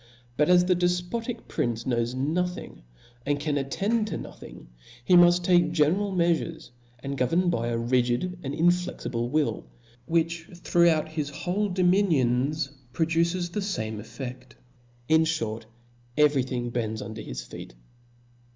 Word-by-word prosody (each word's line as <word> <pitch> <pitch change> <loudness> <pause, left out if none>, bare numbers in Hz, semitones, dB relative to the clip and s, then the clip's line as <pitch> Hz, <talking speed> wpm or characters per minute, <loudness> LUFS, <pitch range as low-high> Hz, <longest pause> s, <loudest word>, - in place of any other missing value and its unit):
But 150 +5 +2
as 180 0 +6
the 180 0 +3
defpotic 180 +7 -2
prince 115 -1 -2
knows 120 -1 0
nothing, 170 - -2 0.4
and 145 +2 0
cai^ 145 -1 0
attend 210 +11 0
to - - -3
nothing, - - -11 0.4
he - - +3
muft 175 0 +6
take 175 -2 +4
general 175 +6 +2
meafures, 170 -4 0 0.3
and 140 0 -3
govern 165 +8 +2
by 115 -7 -1
a 120 -1 -1
rigid 125 +9 0
and 140 -1 -4
inflexible 170 -8 0
will, 150 - 0 0.4
wHicIi 165 +1 -1
throughout 170 -3 +3
his 155 -2 -3
whole 190 +7 -2
dominions 155 -7 +2 0.2
produces 170 +3 0
the 210 - -2
fame 110 - -3
effci^l 120 +3 -7 0.4
\ 120 0 -33
in 160 0 +5
(hort, 115 -9 -2 0.5
every 150 -2 +4
thing 125 -2 -3
bcnd$ 110 -2 -2
uiidcr 110 - -7
bis - - -6
feet. - - -10
160 Hz, 140 wpm, -26 LUFS, 125-175 Hz, 0.5 s, as